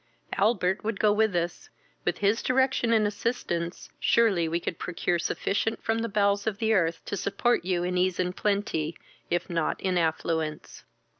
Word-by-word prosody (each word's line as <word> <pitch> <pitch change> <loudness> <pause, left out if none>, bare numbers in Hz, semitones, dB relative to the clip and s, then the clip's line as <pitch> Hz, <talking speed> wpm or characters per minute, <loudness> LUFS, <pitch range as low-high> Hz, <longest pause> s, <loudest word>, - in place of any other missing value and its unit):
Albert 195 -2 +1
would 220 -2 -2
go 210 -1 +4
with 215 -2 +2
us: 175 0 -2 0.4
with - - 0
his 205 +3 +2
direction 260 -2 +2
and 220 -2 +4
assistance, 200 -5 -3
surely 200 -8 +3
we 165 +1 0
could 170 0 -4
procure 175 0 -1
sufficient 205 +5 -1
from 225 0 0
the 230 0 -2
bowels 200 0 +1
of 210 -3 -1
the 220 +1 +1
earth 170 -5 +1
to - - -3
support 200 +4 +1
you 180 -2 0
in 180 +1 -1
ease 185 -1 +1
and 180 0 0
plenty, 200 -6 -1 0.3
if 175 0 0
not 165 -3 -1
in 185 -2 +1
affluence." 160 -1 -2
195 Hz, 170 wpm, -27 LUFS, 175-220 Hz, 0.4 s, go